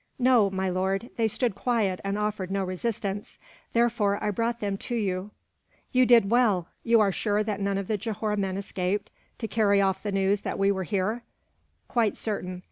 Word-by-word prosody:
"No, 245 -6 +4
my 190 0 -2
lord. 190 +5 -1
They 230 -2 +2
stood 235 +1 0
quiet, 210 -4 0
and 195 +1 -1
offered 210 -3 -2
no 195 0 0
resistance, 200 +2 -3 0.4
therefore 230 -4 +2
I 210 - +1
brought 230 +3 -1
them 200 -1 -1
to 240 - -4
you." 195 -3 -1 0.6
"You 255 -1 +4
did 230 -4 +5
well. 215 -8 +3 0.2
You 230 0 +4
are 205 -2 +4
sure 210 +2 0
that 210 -2 -3
none 200 0 0
of 195 - -2
the 215 +2 -1
Johore 215 0 -2
men 195 -2 -1
escaped, 195 0 -2 0.3
to 225 - -4
carry 205 -3 +3
off 190 -1 +1
the 205 - -3
news 195 +1 +1
that - - -3
we 195 0 +3
were 190 -2 -2
here?" 210 +4 -1 0.7
"Quite 230 -4 +1
certain. 185 -4 -3
205 Hz, 190 wpm, -27 LUFS, 195-225 Hz, 0.7 s, did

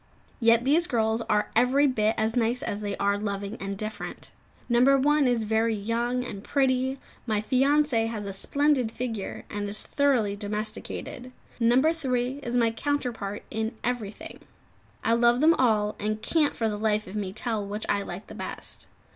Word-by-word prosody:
Yet 230 0 +4
these 325 +6 +4
girls 225 -1 +1
are 210 0 +1
every 255 +5 +4
bit 220 -5 +2
as 220 +1 0
nice 240 +1 +1
as 205 - -3
they 205 -1 -3
are 200 0 +1
loving 200 0 -3
and 195 0 -5
different. 215 0 -6 0.4
No. 240 0 +3 0.2
1 290 +1 +3
is 240 -2 +1
very 220 +1 +1
young 235 +4 -1
and 200 -3 -7
pretty; 265 -1 +1 0.3
my 215 -2 +1
fiancée 260 0 +2
has 215 -3 -5
a 195 - -4
splendid 275 +3 +1
figure, 225 -5 -5
and 205 0 -4
is 210 - -4
thoroughly 255 -8 +1
domesticated; 215 +5 -5 0.3
No. 250 +7 +4
3 260 -4 -1
is 245 -2 -2
my 230 -2 +3
counterpart 230 -6 -3
in 220 +2 -3
everything. 235 -4 -4 0.6
I 230 - +3
love 240 +1 +4
them 315 +3 +6
all, 215 -7 +2
and 215 +1 -1
can't 305 +4 +1
for 225 - 0
the 210 -1 -3
life 215 -1 +1
of 185 - -9
me 200 -3 -2
tell 220 +1 -2
which 205 +2 -4
I 200 - +1
like 195 +1 -7
the - - -11
best. - - -4
230 Hz, 170 wpm, -27 LUFS, 210-255 Hz, 0.6 s, them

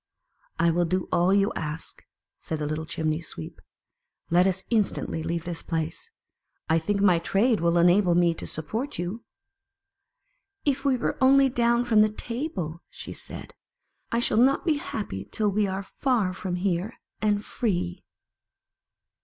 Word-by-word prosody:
"I 170 - +3
will 175 +1 +2
do 185 +2 -1
all 175 +2 +3
you 200 +2 +3
ask," 155 +1 -5 0.4
said 160 - -4
the 150 - -3
little 155 +1 -3
Chimney 155 0 -1
sweep. 85 - -8 0.4
" - - -52
Let 180 +2 +5
us 190 0 0
instantly 210 -6 0
leave 165 +1 -2
this 170 -1 -4
place. 165 -1 -3 0.6
I 160 +1 +3
think 200 +5 -1
my 180 -4 +5
trade 205 +6 +2
will 170 0 +3
enable 175 +1 +4
me 175 -1 +4
to - - -3
support 225 - -4
you." 180 +7 -4 1.4
"If 280 -2 +1
we 270 -2 +3
were - - -2
only 270 +1 +6
down 235 -1 +2
from 225 -3 +4
the 215 - +5
table," 215 - -4
said - - -8
she. - - -9 0.3
" - - -47
I 230 - +1
shall 235 -2 +1
not 270 +6 +4
be 315 -4 +2
happy 205 - -5
till 210 -2 +1
we 205 +1 +1
are 190 +1 -3
far 215 -3 0
from 185 -1 -4
here, 185 +3 -1 0.2
and 210 -1 +1
free." 175 - -2
190 Hz, 160 wpm, -26 LUFS, 170-230 Hz, 1.4 s, only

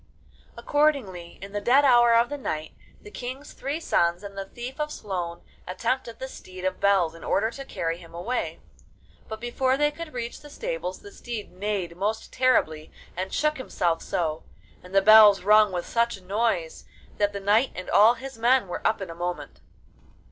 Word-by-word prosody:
Accordingly, 255 - 0
in 200 - -8
the 205 0 -3
dead 265 +6 +4
hour 240 -3 +6
of 235 +1 +4
the 290 - -4
night, 155 -10 -4 0.3
the 420 - -11
King's 260 +1 -7
three 285 +4 -4
sons 175 - +1
and 200 -1 -8
the 195 0 -5
Thief 250 +6 -8
of 300 0 -2
Sloan 175 -4 -5 0.2
attempted 230 +5 -2
the 265 - -6
Steed 185 -7 -10
of 185 0 -1
Bells 195 -5 +3
in 165 - -13
order 220 +4 +1
to 275 - -8
carry 165 -9 -3
him 170 -2 -14
away, 180 +10 -3 0.7
but 220 0 -6
before 255 +3 0
they 295 +1 +2
could 330 +1 -8
reach 235 -1 -5
the 295 - -12
stables - - -5
the 405 - -12
steed 235 - -7
neighed 185 -2 -3
most 210 +4 -3
terribly 160 -12 +1 0.2
and 185 +2 -4
shook 305 -1 0
himself 170 -9 -1
so, 160 -2 -2 0.4
and 180 +2 -11
the 195 - +5
bells 210 -2 +8
rung 210 0 +5
with 175 -1 -3
such 235 -3 0
noise, 190 -3 -2 0.3
that 205 -1 +2
the 200 - -5
knight 210 +6 +3
and 185 - -7
all 220 +4 +6
his 260 0 -9
men 240 -1 +3
were 175 - -5
up 220 - +1
in 195 - -5
a - - -6
moment. 175 +1 -5
215 Hz, 185 wpm, -26 LUFS, 185-255 Hz, 0.7 s, bells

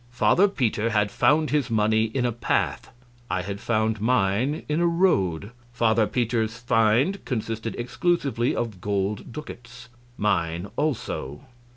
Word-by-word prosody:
A. 120 0 -28
Father 185 +10 +4
Peter 115 - 0
had 105 -2 +1
found 155 +1 +2
his 145 -4 +1
money 110 0 +2
in 125 +3 -2
a 120 - +1
path 120 +1 -1 0.4
I 95 - -1
had 100 +1 -5
found 110 -1 0
mine 120 +4 +1
in 150 +2 0
a 175 - +3
road. 105 - +1 0.2
Father 115 -3 +2
Peter's 115 -2 -1
find 120 - +2
consisted 115 -2 -3
exclusively 125 - 0
of 110 -6 -4
gold 100 +2 -2
ducats 125 -3 -10 0.3
mine 90 -3 -1
also. 110 - -3
115 Hz, 140 wpm, -25 LUFS, 105-125 Hz, 0.4 s, Father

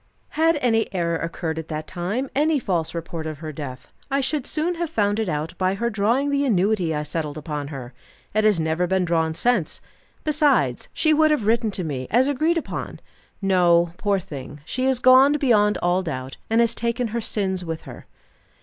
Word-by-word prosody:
"Had 325 +1 +2
any 225 -3 +1
error 170 -2 0
occurred 160 -1 -3
at 160 - -7
that 155 0 -4
time, 190 - -3
any 305 +2 +3
false 175 - -2
report 165 -1 -5
of 155 -1 -5
her 155 +1 -6
death, 140 -3 -8 0.2
I 275 0 +1
should 275 0 -1
soon 325 +3 0
have 340 - -1
found 205 -6 +1
it 220 -4 -1
out 155 +2 -3
by 185 +1 +1
her 235 +4 -1
drawing 230 +7 +1
the 280 0 +1
annuity 195 - +1
I 150 - -2
settled 150 -1 -4
upon 150 -2 -4
her. 135 -4 -8 0.4
It 215 +1 +2
has 210 -5 +4
never 160 +3 0
been 190 0 +1
drawn 160 -2 0
since. 235 -6 +1 0.4
Besides, 285 - +2
she 315 -1 +2
would 310 +1 +4
have 300 -9 +1
written 225 0 +2
to 190 -2 -2
me, 135 -5 -4
as 245 +6 +3
agreed 310 +5 +1
upon. 330 - -5 0.4
No, 175 -3 +3
poor 205 -1 +1
thing, 145 -6 -8
she 255 +10 -1
is 265 -1 +2
gone 255 +3 +6
beyond 220 -8 +3
all 175 +1 +2
doubt, 130 -7 -5
and 225 +1 +4
has 230 -1 +3
taken 235 +1 -1
her 235 +2 -2
sins 190 -4 -1
with 165 -2 -5
her." - - -11
195 Hz, 195 wpm, -23 LUFS, 160-250 Hz, 0.4 s, gone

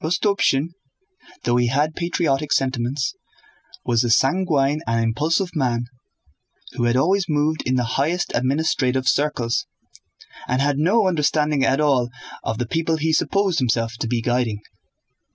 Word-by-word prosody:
Rostopchín, 170 -4 +1 0.7
though 120 - +1
he 120 0 +2
had 145 +5 +1
patriotic 155 -5 -1
sentiments, 130 +1 0 0.7
was 120 -1 +2
a 120 - -1
sanguine 145 +2 +2
and 115 0 +1
impulsive 160 - 0
man 120 -5 0 0.9
who 120 - -2
had 120 +1 +2
always 185 +7 +2
moved 150 +1 +1
in 130 - +1
the 125 - +1 0.2
highest 175 +5 -1
administrative 130 -1 0
circles 130 -5 0 0.8
and 125 +1 0
had 140 0 +1
no 195 +6 +3
understanding 150 -4 +1
at 135 +1 +2
all 135 -5 +2 0.3
of 110 - -2
the 120 - -2
people 160 +5 -1
he 160 +1 0
supposed 195 +1 +1
himself 115 -2 0
to - - -2
be 115 -1 -1
guiding. 120 -4 -1
140 Hz, 140 wpm, -21 LUFS, 125-160 Hz, 0.9 s, no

